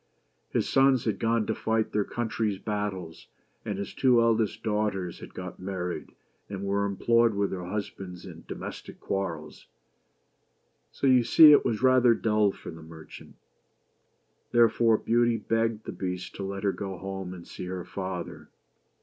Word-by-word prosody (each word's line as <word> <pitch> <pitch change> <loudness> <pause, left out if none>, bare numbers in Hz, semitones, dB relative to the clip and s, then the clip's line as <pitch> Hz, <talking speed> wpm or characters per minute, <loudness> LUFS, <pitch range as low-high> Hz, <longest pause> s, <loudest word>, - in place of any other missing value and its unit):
His - - 0
sons 135 -2 +3
had 110 - -1
gone 115 -1 +1
to 110 - -1
fight 110 0 -1
their 105 - +1
country's 110 -2 -2
battles, 100 -5 -4 0.4
and 100 - -4
his 100 0 -5
two 125 -3 +4
eldest 115 -2 +1
daughters 105 -5 -1
had - - -12
got - - -7
married 90 -2 -5 0.3
and 100 -1 -5
were 100 +1 0
em 100 -1 -3
ployed 115 -1 +3
with 100 0 0
their 90 -2 -4
husbands 95 -2 -6
in 85 -3 -11
domestic - - -8
quarrels; 85 -6 -4 1.2
so - - -4
you 130 -2 +5
see 150 +6 +8
it 145 - +6
was 110 +1 -1
rather 130 -2 +5
dull 105 -3 +2
for - - -10
the 80 0 -11
merchant. 80 0 -12 1.2
Therefore 115 -1 +4
Beauty 120 +1 +2
begged 115 0 -1
the - - -5
Beast 90 -1 -5
to 100 - -4
let 100 +1 -5
her 100 - +2
go 95 -2 -5
home 95 -1 -6
and 85 - -12
see - - -7
her 90 0 -5
father. 95 -2 -6
105 Hz, 160 wpm, -27 LUFS, 95-115 Hz, 1.2 s, see